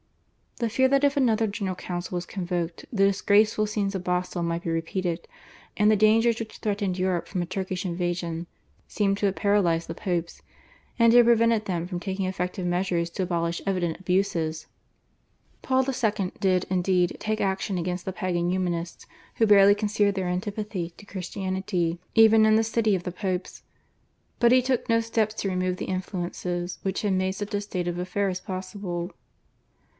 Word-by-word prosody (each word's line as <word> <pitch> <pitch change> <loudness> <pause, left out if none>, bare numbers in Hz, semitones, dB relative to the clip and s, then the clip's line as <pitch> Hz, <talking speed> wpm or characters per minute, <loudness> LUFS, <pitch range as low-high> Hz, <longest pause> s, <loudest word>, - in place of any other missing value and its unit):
The 235 -2 -1
fear 260 +4 +3
that 275 +1 +3
if 285 0 +3
another 225 -4 +3
General 200 -3 -3
Council 180 0 -5
were 175 - -1
convoked 175 -2 -4
the 195 -4 +3
disgraceful 210 +2 +3
scenes 205 -2 -1
of 185 - -3
Basle 180 0 -1
might 170 +1 -2
be - - -3
repeated, 170 +1 -2 0.5
and 210 +1 +4
the 215 - +5
dangers 225 +2 +4
which 220 -1 -7
threatened 200 -3 -1
Europe 185 -2 0
from 185 - -2
a - - -1
Turkish 185 0 -3
invasion, 175 -1 -2 0.4
seem 200 -2 +1
to 200 0 +1
have 195 - -1
paralysed 185 -5 +2
the - - -5
Popes, 175 -4 -3 0.6
and 230 0 +6
to 240 - +6
have 240 - +8
prevented 230 -2 +4
them 175 -3 -2
from 180 -1 -4
taking 190 0 -3
effective 180 0 -3
measures 175 -1 0
to 185 - -2
abolish 170 -1 -1
evident 180 -4 -1
abuses. 180 -4 0 1.0
Paul 260 0 +2
II. 215 -7 0
did, 185 -3 +2
indeed, 180 -1 +1
take 215 0 -2
action 195 0 -1
against 180 0 -3
the 190 - -3
Pagan 175 -3 -1
Humanists 175 -2 -2 0.3
who 225 - +3
barely 200 -1 +7
concealed 205 -1 +1
their 190 -2 -1
antipathy 190 -1 -3
to 205 - -13
Christianity 185 -2 -2
even 220 0 +6
in 215 0 +5
the 220 - +4
city 220 -2 +1
of 180 - -3
the 180 - -4
Popes, 185 0 -4 0.8
but 235 -1 +5
he 255 0 +6
took 255 -2 -1
no 230 0 +4
steps 225 -1 0
to 200 - -2
remove 185 0 -1
the - - -4
influences 180 -1 -3
which 195 +1 -2
had 205 -2 +1
made 185 0 +1
such 205 +2 -6
a 205 - 0
state 185 -4 -4
of 175 0 -2
affairs 185 0 -1
possible. 185 -1 -5
190 Hz, 175 wpm, -26 LUFS, 180-210 Hz, 1.0 s, have